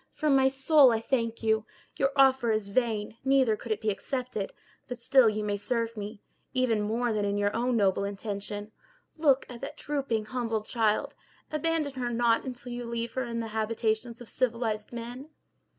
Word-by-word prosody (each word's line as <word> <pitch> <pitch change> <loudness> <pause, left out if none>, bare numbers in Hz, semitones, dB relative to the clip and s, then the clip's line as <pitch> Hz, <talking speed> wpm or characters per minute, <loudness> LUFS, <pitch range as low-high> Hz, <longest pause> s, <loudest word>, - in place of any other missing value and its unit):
from 300 -3 +2
my 265 0 +5
soul 270 0 +5
I 225 - +1
thank 230 -1 -1
you. 220 -1 +2 0.3
Your 275 - +2
offer 265 -4 +5
is 215 -2 0
vain, 220 -1 -1
neither 265 -4 +4
could 225 +2 -8
it 215 - -1
be 215 -1 +1
accepted; 245 -1 -3 0.4
but 245 - -5
still 245 0 +5
you 215 0 -2
may 205 -1 -1
serve 230 +2 -1
me, 205 0 -7 0.3
even 245 -4 +2
more 225 +3 0
than 210 -1 0
in 200 0 0
your 205 0 +1
own 245 0 +1
noble 195 -2 +2
intention. 205 +1 -5 0.5
Look 275 -4 +4
at 245 -2 -9
that - - -6
drooping 270 -7 -2
humbled 225 -2 -2
child! 230 +5 +1 0.4
Abandon 310 -2 0
her 245 - 0
not 235 -1 +2
until 250 -1 -6
you 240 0 -4
leave 235 0 -3
her 260 -1 -1
in 230 -1 -3
the 225 - -5
habitations 220 +1 -1
of 240 - -9
civilized 230 -4 -1
men. 240 +4 -7
230 Hz, 180 wpm, -28 LUFS, 215-255 Hz, 0.5 s, my